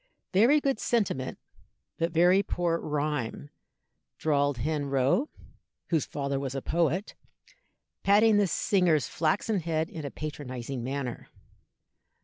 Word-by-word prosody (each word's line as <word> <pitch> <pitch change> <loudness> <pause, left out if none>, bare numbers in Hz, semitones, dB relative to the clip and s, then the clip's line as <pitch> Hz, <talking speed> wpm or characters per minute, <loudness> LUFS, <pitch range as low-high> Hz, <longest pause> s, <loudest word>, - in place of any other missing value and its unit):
"Very 235 +10 +5
good 275 -5 0
sentiment, 195 - -1 0.6
but 165 +1 0
very 175 +4 +5
poor 175 -3 -1
rhyme," 145 -2 -3 0.7
drawled 145 -3 +1
Hen 145 +4 -1
Rowe 140 - +1 0.6
(whose 160 -4 +1
father 140 -1 -2
was 135 -1 -4
a - - 0
poet), 170 +4 0 0.9
patting 210 +2 +5
the 205 -1 +3
singer's 175 -3 +2
flaxen 190 +6 0
head 160 -1 -2
in 160 - -6
a 140 - -3
patronizing 130 -4 -6
manner. 130 -1 -4
155 Hz, 120 wpm, -28 LUFS, 140-185 Hz, 0.9 s, Very